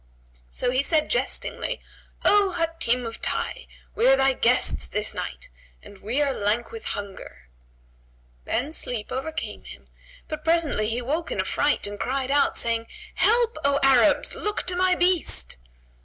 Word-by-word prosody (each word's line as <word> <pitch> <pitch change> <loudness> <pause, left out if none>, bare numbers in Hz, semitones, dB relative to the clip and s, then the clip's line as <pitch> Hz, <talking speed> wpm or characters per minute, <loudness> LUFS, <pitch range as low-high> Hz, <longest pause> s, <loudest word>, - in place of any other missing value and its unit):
So 245 - -1
he 255 +1 +2
said 310 +1 +1
jestingly, - - -1 0.5
"O 405 -2 +4
Hatim 330 -8 0
of 230 0 -7
Tayy! - - -3 0.3
we 470 - +2
are - - +7
thy 270 - +3
guests 250 0 +2
this 210 +1 -2
night, - - -6 0.3
and 200 - -14
we 230 +9 -2
are 275 -2 0
lank 210 +3 -1
with 455 -1 -9
hunger." 200 - -9 1.0
Then 280 +7 -1
sleep 235 -8 -2
overcame 310 +5 -4
him, - - -13 0.4
but 310 -1 -6
presently 320 -10 +1
he 230 - -1
awoke 290 +7 -2
in - - -3
affright 290 0 +1
and 205 0 -6
cried 265 +1 -1
out, 285 0 +2
saying, 230 -1 +1 0.3
"Help, 470 +1 +2
O 280 0 +2
Arabs! 270 +2 +4
Look 420 0 -2
to 360 - -1
my 365 0 +3
beast!" 350 - +2
275 Hz, 155 wpm, -24 LUFS, 235-340 Hz, 1.0 s, are